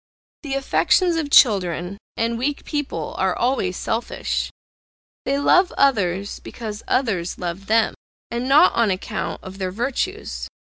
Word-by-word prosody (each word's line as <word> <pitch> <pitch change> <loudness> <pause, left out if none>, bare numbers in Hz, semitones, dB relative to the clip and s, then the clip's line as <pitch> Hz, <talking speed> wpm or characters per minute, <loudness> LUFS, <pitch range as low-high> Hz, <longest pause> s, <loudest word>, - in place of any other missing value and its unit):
The 280 -3 -3
affections 340 +6 +2
of 315 -3 -1
children, 190 - +4 0.2
and 230 +1 0
weak 280 +3 -2
people, 275 - -3
are 190 -1 +1
always 235 -8 0
selfish; 225 +2 -2 0.8
they 275 - +1
love 360 +6 +4
others, 200 -8 +1
because 215 -2 -7
others 200 -10 0
love 180 +2 -5
them, 225 0 +3 0.4
and 240 +2 -2
not 285 +3 +6
on 230 -2 +2
account 185 -1 -3
of 190 +1 -9
their 185 -1 -1
virtues. 265 - -3
230 Hz, 135 wpm, -22 LUFS, 190-275 Hz, 0.8 s, not